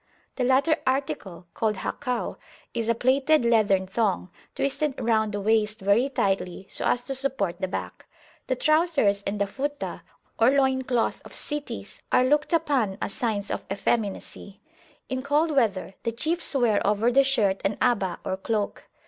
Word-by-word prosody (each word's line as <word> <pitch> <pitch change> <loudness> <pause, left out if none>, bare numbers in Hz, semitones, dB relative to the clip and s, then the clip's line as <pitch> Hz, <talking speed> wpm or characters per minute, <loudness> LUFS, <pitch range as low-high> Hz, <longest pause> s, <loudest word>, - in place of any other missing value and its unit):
The 255 - -1
latter 275 +5 +3
article, 205 -10 -2
called 220 -2 0
Hakw, 250 +5 -3 0.4
is 230 -1 -2
a 230 - +3
plaited 265 +3 +3
leathern 205 -5 +3
thong, 190 -2 -1 0.2
twisted 280 0 -1
round 220 -3 +1
the 205 - -3
waist 215 +1 +1
very 200 +7 +3
tightly, 195 -7 -1
so - - -2
as 245 - +1
to 270 - -4
support 260 -9 -1
the 190 - 0
back. 185 - -6 0.4
The 255 - +1
trousers 305 - +2
and 200 +1 -2
the 200 - +2
Futah, 285 +7 -4 0.4
or 230 +2 +6
loin 265 -1 +3
cloth 245 -3 0
of - - -5
cities, 290 - -5
are 255 - +4
looked 295 +4 +2
upon 280 - +1
as 200 - -3
signs 210 -4 -2
of - - -3
effeminacy. 200 -1 -2 0.5
In 260 -1 -2
cold 295 +4 +2
weather 220 -9 +1
the 230 - -1
chiefs 315 +7 -1
wear 235 -6 +3
over 210 +4 +2
the 275 +2 +5
shirt 215 -8 +1
an 200 +1 0
Aba, 210 -7 +1
or 190 - -1
cloak. 210 +1 -2
235 Hz, 165 wpm, -26 LUFS, 200-270 Hz, 0.5 s, or